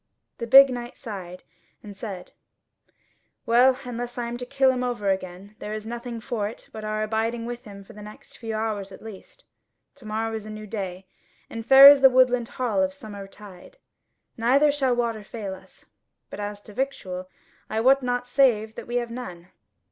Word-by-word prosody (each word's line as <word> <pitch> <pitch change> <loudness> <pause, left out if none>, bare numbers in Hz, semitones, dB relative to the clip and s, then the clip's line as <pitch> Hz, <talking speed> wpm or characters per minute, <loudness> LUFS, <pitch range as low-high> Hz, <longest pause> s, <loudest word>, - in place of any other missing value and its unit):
The 235 - -4
big 270 +2 +9
knight 245 0 -6
sighed, 185 -6 -8 0.4
and 205 -2 -10
said: 195 -3 -7 1.1
"Well, 250 +3 +5
unless 245 0 -5
I 240 - -2
am 240 - -5
to 250 0 -7
kill 270 0 +3
him 250 -1 -2
over 235 -5 -1
again, 190 +2 -5
there 210 +1 -5
is 215 0 -6
nothing 235 +1 -6
for 220 -3 -3
it 220 - -10
but 220 - -8
our 215 0 -2
abiding 225 +2 -2
with 240 +1 -7
him 200 -2 -11
for - - -15
the 210 - -11
next 210 +1 -13
few 225 -2 -5
hours 215 -3 -3
at 190 - -12
least. 225 - -12 0.5
To 255 - -16
morrow 220 +1 -2
is 215 -1 -5
a - - -8
new 215 0 -8
day, 195 -3 -5 0.5
and 225 0 -5
fair 270 +3 +10
is 285 -1 +3
the 265 - +9
woodland 250 -2 +3
hall 230 -7 -1
of 190 0 0
summer 200 -1 -9
tide; 200 - -14 0.6
neither 270 +6 +4
shall 270 -4 +1
water 230 -3 -2
fail 205 -2 -6
us. 190 - -15 0.5
But - - -7
as 205 0 -5
to 210 - -13
victual, 190 -8 -4 0.4
I 220 - -1
wot 265 +4 +4
not 245 -1 -1
save 245 -4 +2
that - - -9
we 240 - -4
have 240 -1 -1
none." 180 -8 -8
225 Hz, 195 wpm, -25 LUFS, 205-245 Hz, 1.1 s, fair